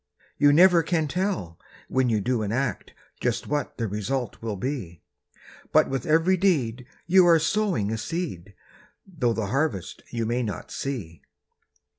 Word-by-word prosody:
You 145 0 +6
never 175 +2 +6
can 160 -1 0
tell 175 - -2 0.3
when 130 -1 +1
you 110 -2 +1
do 120 +2 0
an 105 -1 -2
act 130 +2 -2 0.2
Just - - -1
what 150 0 -3
the 115 - -1
result 105 +6 -3
will 110 -2 -3
be; 100 - -5 0.7
But - - +4
with 135 -3 -3
every 165 +4 +3
deed 130 - 0 0.2
you 180 +1 +5
are 170 -1 +7
sowing 160 - 0
a 110 - -2
seed, 105 - -5 0.5
Though 160 -11 -1
the 110 -2 -2
harvest 135 - -1
you 115 -1 -2
may 120 +3 0
not 110 -4 -5
see. 95 - -5
130 Hz, 155 wpm, -25 LUFS, 110-165 Hz, 0.7 s, are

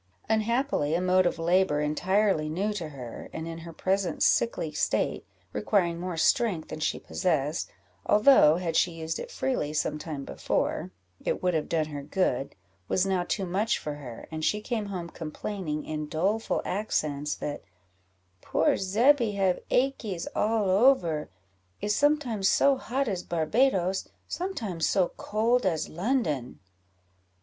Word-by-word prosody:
Unhappily, 220 - +1
a - - +2
mode 185 0 +3
of - - -1
labour 170 -2 +2
entirely 175 +2 +1
new 195 +7 -1
to 170 -6 -4
her, 125 -5 -8
and, 160 +1 -5
in 165 0 -6
her 165 0 -9
present 190 +3 0
sickly 230 -9 +2
state, 150 - -1 0.3
requiring 175 -5 +1
more 180 -1 -4
strength 180 0 +2
than - - -6
she 155 - 0
possessed, 155 -3 -1 0.4
although, 210 - +6
had 170 -2 -2
she 180 - +4
used 160 0 -4
it - - -6
freely 260 - -1
some 150 0 -1
time 150 -4 -5
before, - - -1 0.3
it - - -2
would 180 -1 +2
have 155 -2 -1
done 160 -2 +1
her 145 -2 -6
good, 140 -3 -1 0.3
was 185 - +2
now 190 -2 +1
too 195 +2 -2
much 195 +5 0
for 150 - -5
her, 130 -6 -9
and 155 0 -4
she 210 - +2
came 215 -1 -3
home 180 -4 -4
complaining, 160 0 -5
in 155 -1 -4
doleful 195 +9 0
accents, 150 -7 -1
that 145 - -5 0.8
"poor 160 - +2
Zebby 230 +4 +3
have 190 -2 +1
achies 240 -9 0
all 215 -1 +1
over 185 - +3 0.5
is 210 0 0
sometimes 280 -9 +2
so 280 0 +4
hot 265 +1 -2
as 190 -5 -1
Barbadoes, 185 +3 +1 0.2
sometimes 220 - -2
so 185 -3 +2
cold 230 +4 +1
as 165 -5 0
London." 170 - -1
185 Hz, 150 wpm, -28 LUFS, 155-215 Hz, 0.8 s, although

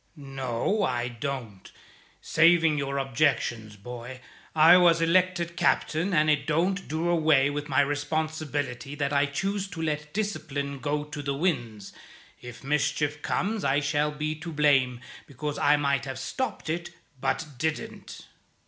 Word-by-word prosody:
"No, 135 - -2
I 125 -8 0
don't. 120 -5 -6 0.5
Saving 165 -1 +4
your 140 -1 -2
objections, 120 -5 0
boy, 125 +4 -9 0.4
I 160 +3 +8
was 175 -2 +5
elected 170 0 +1
captain, 170 +1 +1
and 155 -3 +3
it 150 -2 +2
don't 180 +5 0
do 160 +3 -2
away 155 -5 +3
with 145 0 -4
my 130 +1 +4
responsibility 145 -2 -2
that 145 -1 -1
I 140 0 +3
choose 195 +7 -2
to 180 - -9
let 150 -1 -2
discipline 145 -9 -3
go 145 +1 -1
to 150 0 -7
the 140 -1 -2
winds. 120 - -2 0.5
If 120 +1 -10
mischief 150 +1 0
comes 210 +6 -1
I 135 +2 +2
shall 145 +1 0
be 150 +1 -3
to 170 +1 -6
blame, 135 -5 +2 0.3
because 145 +1 -5
I 150 - +4
might 140 -2 0
have 135 -1 -5
stopped 255 - -4
it 170 +2 -3 0.3
but 160 - -1
didn't." 160 0 -4
150 Hz, 145 wpm, -27 LUFS, 135-165 Hz, 0.5 s, I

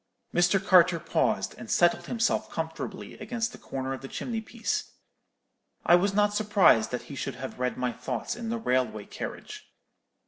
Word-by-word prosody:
"Mr. 175 +3 +4
Carter 180 -3 +5
paused, - - 0
and - - -9
settled 175 0 +3
himself 230 -1 0
comfortably - - -5
against 235 -1 -2
the - - -12
corner 135 0 -4
of 130 - -6
the 135 - -7
chimney 225 - -4
piece. 225 +1 -3 0.9
I - - +5
was 195 +3 +4
not 205 0 +3
surprised 205 - +4
that 125 - -4
he 140 - -9
should - - -4
have 130 0 -7
read 125 0 -1
my 125 -1 0
thoughts 125 - -4
in 230 -1 -5
the 230 - -1
railway 125 - 0
carriage. - - -8
175 Hz, 170 wpm, -28 LUFS, 130-215 Hz, 0.9 s, Carter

